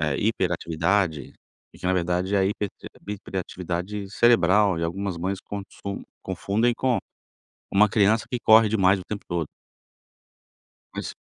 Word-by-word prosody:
eh, 75 Hz, -2 st, 0 dB
hiperatividade 90 Hz, -, 0 dB, 0.4 s
e -, -, -16 dB
que -, -, -5 dB
na 95 Hz, -, +3 dB
verdade 90 Hz, +2 st, 0 dB
é -, -, +4 dB
a 95 Hz, -, +3 dB
hipertivi 100 Hz, 0 st, -4 dB, 0.2 s
hiperatividade 95 Hz, +1 st, -5 dB
cerebral 105 Hz, -5 st, +4 dB
e 85 Hz, -, -1 dB
algumas 95 Hz, +2 st, -3 dB
mães 95 Hz, +3 st, -2 dB
contsun 100 Hz, 0 st, -7 dB, 0.2 s
confundem 110 Hz, +5 st, 0 dB
com 130 Hz, -2 st, +1 dB, 0.7 s
uma 105 Hz, +2 st, +5 dB
criança 105 Hz, +2 st, +3 dB
que 125 Hz, -1 st, -2 dB
corre 110 Hz, -1 st, +6 dB
demais 100 Hz, -2 st, +3 dB
o 90 Hz, -, -8 dB
tempo 105 Hz, -1 st, -5 dB
todo. 85 Hz, -3 st, -2 dB, 1.5 s
Mas -, -, -5 dB
100 Hz, 140 wpm, -25 LUFS, 90-105 Hz, 1.5 s, corre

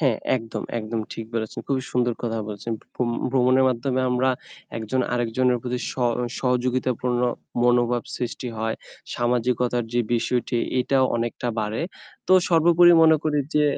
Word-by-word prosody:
হ্যাঁ 130 Hz, -8 st, +2 dB, 0.2 s
একদম, 115 Hz, -2 st, -5 dB, 0.2 s
একদম 110 Hz, +1 st, -3 dB
ঠিক 115 Hz, -, -6 dB
বলেছেন। 110 Hz, 0 st, -3 dB
খুবই 135 Hz, -2 st, 0 dB
সুন্দর 120 Hz, -1 st, +2 dB
কথা 115 Hz, -1 st, -2 dB
বলেছেন। 105 Hz, +3 st, -5 dB, 0.2 s
ভ্রম 120 Hz, -2 st, -1 dB, 0.2 s
ভ্রমণের 130 Hz, 0 st, +4 dB
মাধ্যমে 130 Hz, +1 st, -1 dB
আমরা 125 Hz, +1 st, +2 dB, 0.5 s
একজন 115 Hz, +4 st, -1 dB
আরেকজনের 125 Hz, +1 st, +1 dB
প্রতি 125 Hz, 0 st, -2 dB
স -, -, -5 dB, 0.5 s
সহযোগিতাপূর্ণ 125 Hz, -1 st, 0 dB, 0.4 s
মনোভাব 120 Hz, -1 st, +3 dB
সৃষ্টি 125 Hz, 0 st, -4 dB
হয়। 110 Hz, 0 st, -1 dB, 0.4 s
সামাজিকতার 120 Hz, 0 st, 0 dB
যে 120 Hz, -, +2 dB
বিষয়টি, 120 Hz, +1 st, 0 dB, 0.2 s
এটাও 130 Hz, +1 st, +2 dB
অনেকটা 120 Hz, +1 st, -2 dB
বাড়ে। 105 Hz, +1 st, -2 dB, 0.5 s
তো -, -, +3 dB, 0.2 s
সর্বোপরি 175 Hz, +1 st, +6 dB
মনে 160 Hz, -1 st, +6 dB
করি 150 Hz, -1 st, +1 dB, 0.2 s
যে 150 Hz, 0 st, +4 dB
125 Hz, 140 wpm, -24 LUFS, 115-130 Hz, 0.5 s, সর্বোপরি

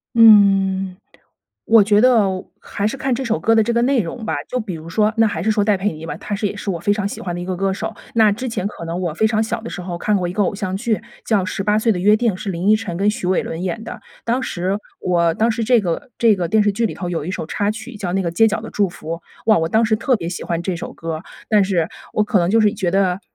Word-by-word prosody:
嗯， 195 Hz, -4 st, +5 dB, 0.7 s
我 225 Hz, -2 st, +6 dB
觉 205 Hz, 0 st, +4 dB
得， 215 Hz, -7 st, +3 dB, 0.2 s
还 200 Hz, -, -3 dB
是 235 Hz, -, -5 dB
看 265 Hz, -1 st, -1 dB
这 255 Hz, -, -3 dB
首 230 Hz, -3 st, 0 dB
歌 225 Hz, -, +2 dB
的 225 Hz, -, +5 dB
这 235 Hz, +2 st, -1 dB
个 235 Hz, -, +2 dB
内 260 Hz, 0 st, +3 dB
容 220 Hz, +5 st, -5 dB
吧。 -, -, -1 dB
就 255 Hz, -, -2 dB
比 215 Hz, -5 st, -5 dB
如 160 Hz, -1 st, -8 dB
说， 210 Hz, +5 st, +2 dB
那 225 Hz, -, +5 dB
还 170 Hz, -6 st, -2 dB
是 220 Hz, -, +1 dB
说 210 Hz, -1 st, +2 dB
戴 205 Hz, 0 st, +3 dB
佩 195 Hz, +1 st, -1 dB
妮 160 Hz, +1 st, -9 dB
吧， 150 Hz, -, -5 dB
她 205 Hz, -, -5 dB
是 205 Hz, +1 st, -1 dB
也 200 Hz, -, -4 dB
是 205 Hz, -, -4 dB
我 170 Hz, -3 st, -3 dB
非 205 Hz, +5 st, +1 dB
常 205 Hz, -1 st, -2 dB
喜 200 Hz, -, -5 dB
欢 175 Hz, -2 st, -4 dB
的 175 Hz, -, -4 dB
一 -, -, -4 dB
个 185 Hz, 0 st, -3 dB
歌 195 Hz, +2 st, 0 dB
手。 -, -, -5 dB, 0.2 s
那 220 Hz, -3 st, +5 dB
之 250 Hz, +5 st, -4 dB
前 215 Hz, -5 st, -3 dB
可 170 Hz, -5 st, -6 dB
能 165 Hz, +1 st, -3 dB
我 175 Hz, -3 st, -1 dB
非 220 Hz, +8 st, +1 dB
常 220 Hz, 0 st, +1 dB
小 225 Hz, +1 st, -2 dB
的 230 Hz, -, -7 dB
时 180 Hz, -, -6 dB
候 175 Hz, -1 st, -5 dB
看 210 Hz, +3 st, +1 dB
过 180 Hz, -2 st, -1 dB
一 175 Hz, -, -4 dB
个 205 Hz, -, +1 dB
偶 200 Hz, -, 0 dB
像 190 Hz, -2 st, -3 dB
剧， 220 Hz, -1 st, -1 dB, 0.2 s
叫 210 Hz, -4 st, +2 dB
《十 185 Hz, +1 st, -3 dB
八 210 Hz, +1 st, +2 dB
岁 225 Hz, +1 st, +2 dB
的 185 Hz, -, -3 dB
约 210 Hz, +4 st, +4 dB
定》， 230 Hz, -1 st, +1 dB
是 200 Hz, -, -6 dB
林 180 Hz, +3 st, 0 dB
依 -, -, +7 dB
晨 200 Hz, -6 st, -3 dB
跟 200 Hz, +3 st, +2 dB
许 210 Hz, -, -5 dB
玮 185 Hz, 0 st, +2 dB
伦 165 Hz, +2 st, -5 dB
演 205 Hz, +5 st, -3 dB
的。 -, -, -8 dB, 0.2 s
当 245 Hz, +3 st, 0 dB
时 190 Hz, -2 st, -2 dB, 0.2 s
我 170 Hz, -2 st, +1 dB
当 225 Hz, +5 st, +2 dB
时 230 Hz, +1 st, -2 dB
这 240 Hz, +2 st, +4 dB
个 180 Hz, +1 st, -3 dB
这 230 Hz, -2 st, +4 dB
个 180 Hz, -3 st, -2 dB
电 215 Hz, +4 st, +3 dB
视 205 Hz, 0 st, +2 dB
剧 230 Hz, +3 st, 0 dB
里 -, -, -5 dB
头 180 Hz, -2 st, -5 dB
有 165 Hz, -3 st, -2 dB
一 -, -, -3 dB
首 185 Hz, -, -4 dB
插 205 Hz, +6 st, -1 dB
曲 220 Hz, +3 st, -7 dB
叫 185 Hz, -3 st, -3 dB
那 195 Hz, -, +1 dB
个 170 Hz, -, -1 dB
《街 225 Hz, +5 st, +5 dB
角 215 Hz, +1 st, -3 dB
的 225 Hz, -, -7 dB
祝 200 Hz, -2 st, +1 dB
福》， 175 Hz, -, -12 dB, 0.4 s
哇， 220 Hz, -1 st, +4 dB
我 165 Hz, 0 st, 0 dB
当 220 Hz, +6 st, +3 dB
时 220 Hz, 0 st, +2 dB
特 245 Hz, +4 st, +1 dB
别 170 Hz, -, -6 dB
喜 175 Hz, +1 st, -4 dB
欢 170 Hz, 0 st, -2 dB
这 185 Hz, +1 st, -2 dB
首 170 Hz, -, -6 dB
歌 165 Hz, -1 st, -4 dB
儿。 155 Hz, -, -9 dB, 0.3 s
但 210 Hz, -2 st, +5 dB
是， 185 Hz, -4 st, +1 dB, 0.3 s
我 215 Hz, -, +2 dB
可 210 Hz, -2 st, +2 dB
能 170 Hz, -1 st, +1 dB
就 225 Hz, +3 st, +4 dB
是 210 Hz, -1 st, +3 dB
觉 195 Hz, -5 st, -1 dB
得， 190 Hz, 0 st, +1 dB
205 Hz, 325 characters per minute, -20 LUFS, 180-220 Hz, 0.7 s, 依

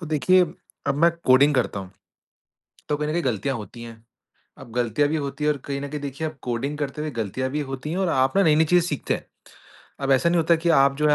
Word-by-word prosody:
तो 170 Hz, -, -7 dB
देखिए 155 Hz, +5 st, +4 dB, 0.4 s
अब 140 Hz, -, +1 dB
मैं 170 Hz, -, +6 dB, 0.2 s
कोडिंग 140 Hz, +3 st, +5 dB
करता 120 Hz, -6 st, 0 dB
हूँ, 95 Hz, -1 st, -10 dB, 1.0 s
तो 150 Hz, -, +1 dB
कहीं 150 Hz, 0 st, -2 dB
न -, -, -1 dB
कहीं 175 Hz, -, 0 dB
गलतियाँ 125 Hz, +2 st, -1 dB
होती 115 Hz, +2 st, -9 dB
हैं, 115 Hz, -1 st, -11 dB, 0.6 s
अब 115 Hz, -, -12 dB
गलतियाँ 125 Hz, +4 st, +1 dB
भी 160 Hz, -, 0 dB
होती 140 Hz, 0 st, -4 dB
हैं 150 Hz, -, +3 dB
और 145 Hz, -, -7 dB
कहीं 140 Hz, -1 st, -3 dB
न 140 Hz, -, -5 dB
कहीं 150 Hz, +1 st, -5 dB
देखिए 140 Hz, +2 st, -4 dB
आप 155 Hz, -2 st, -12 dB
कोडिंग 130 Hz, +5 st, -3 dB
करते 145 Hz, 0 st, -3 dB
हुए 155 Hz, -, -3 dB
गलतियाँ 130 Hz, +6 st, -3 dB
भी 150 Hz, +3 st, -2 dB
होती 135 Hz, +3 st, -5 dB
हैं 175 Hz, -, -2 dB
और 190 Hz, -2 st, +1 dB
आप 130 Hz, 0 st, +1 dB
ना 195 Hz, -, +5 dB
नई-नई 155 Hz, -1 st, +4 dB
चीज़ें 175 Hz, +1 st, +3 dB
सीखते 145 Hz, -, -1 dB
हैं, -, -, -7 dB, 0.7 s
अब 135 Hz, 0 st, -1 dB
ऐसा 135 Hz, +6 st, +3 dB
नहीं 175 Hz, -, +2 dB
होता 165 Hz, +1 st, +4 dB
कि 165 Hz, +1 st, -2 dB
आप 140 Hz, -3 st, +4 dB
जो 150 Hz, +1 st, +1 dB
है 150 Hz, -, +5 dB
145 Hz, 255 wpm, -24 LUFS, 130-155 Hz, 1.0 s, मैं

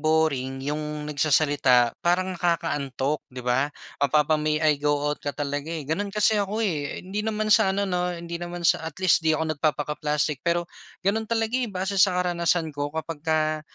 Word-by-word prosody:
boring 140 Hz, -4 st, 0 dB
'yong 150 Hz, +1 st, -3 dB
nagsasalita 145 Hz, -5 st, +3 dB
parang 185 Hz, +2 st, +1 dB
nakakaantok, 145 Hz, -5 st, -1 dB
'di 125 Hz, 0 st, -8 dB
ba? 130 Hz, +3 st, +2 dB, 0.3 s
Mapapa, 150 Hz, +2 st, +3 dB
"May 155 Hz, 0 st, +1 dB
I 150 Hz, -2 st, +3 dB
go 145 Hz, 0 st, +2 dB, 0.2 s
out?" -, -, -8 dB
ka -, -, -4 dB
talaga, 145 Hz, 0 st, -3 dB
eh. 165 Hz, -3 st, -4 dB
Gano'n 195 Hz, +8 st, -2 dB
kasi 210 Hz, +1 st, +3 dB
ako 210 Hz, +3 st, -1 dB
eh. 155 Hz, -7 st, -3 dB
Hindi 195 Hz, +3 st, -3 dB
naman 215 Hz, 0 st, 0 dB
sa 220 Hz, -3 st, +5 dB
ano 200 Hz, 0 st, 0 dB
'no 180 Hz, -2 st, -1 dB
hindi 170 Hz, 0 st, -6 dB
naman 175 Hz, 0 st, -6 dB
sa -, -, +4 dB
at -, -, -7 dB
least 185 Hz, -2 st, +4 dB
'di 160 Hz, -1 st, +2 dB
ako 160 Hz, 0 st, -1 dB
nagpapaka-plastic. 150 Hz, -1 st, -1 dB
Pero 170 Hz, +2 st, 0 dB, 0.4 s
gano'n 220 Hz, +3 st, 0 dB
talaga 225 Hz, -1 st, 0 dB
eh, 245 Hz, -, -1 dB
base 195 Hz, 0 st, -1 dB
sa 185 Hz, -2 st, +5 dB
karanasan 170 Hz, -3 st, 0 dB
ko. 145 Hz, 0 st, -3 dB
Kapagka 155 Hz, -1 st, -1 dB
160 Hz, 180 wpm, -25 LUFS, 145-180 Hz, 0.4 s, sa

